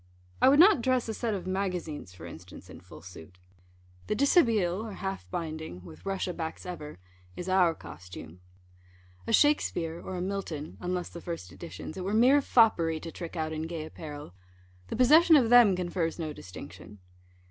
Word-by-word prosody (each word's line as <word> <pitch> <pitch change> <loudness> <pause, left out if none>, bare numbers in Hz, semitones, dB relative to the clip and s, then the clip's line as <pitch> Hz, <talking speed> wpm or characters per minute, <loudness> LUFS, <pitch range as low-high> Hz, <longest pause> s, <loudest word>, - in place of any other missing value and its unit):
I - - +7
would 280 - +5
not 370 - +7
dress 255 0 +1
a 220 - -3
set 225 -2 -2
of 190 - -6
Magazines, 180 - -3
for 90 -2 -12
instance, 90 +2 -11
in 80 - -11
full 90 -1 -14
suit. 90 -1 -12 0.7
The 210 - 0
dishabille, 225 - +3
or 220 -2 -7
half 195 0 -5
binding 160 - -5
(with 195 - -12
Russia 190 -2 -2
backs 160 -1 -6
ever) 155 - -7 0.4
is 180 - -6
our 185 -3 +3
costume. 85 - -11 0.9
A - - -1
Shakespeare, 170 - +2
or 190 - -6
a - - -3
Milton 185 -6 -5
(unless 180 0 -3
the 170 - -9
first 130 - -6
editions), 160 - -9
it 185 - -4
were 200 +3 -1
mere 260 +6 +5
foppery 175 -12 +3
to 165 - -8
trick 170 0 -8
out 160 -1 -2
in 160 +1 -4
gay 165 -2 -5
apparel. 150 - -9 0.5
The - - -4
possession 310 +7 +6
of 245 -5 +4
them 240 -6 +7
confers 175 -2 -2
no 160 -3 -4
distinction. 105 0 -11
175 Hz, 175 wpm, -29 LUFS, 155-210 Hz, 0.9 s, I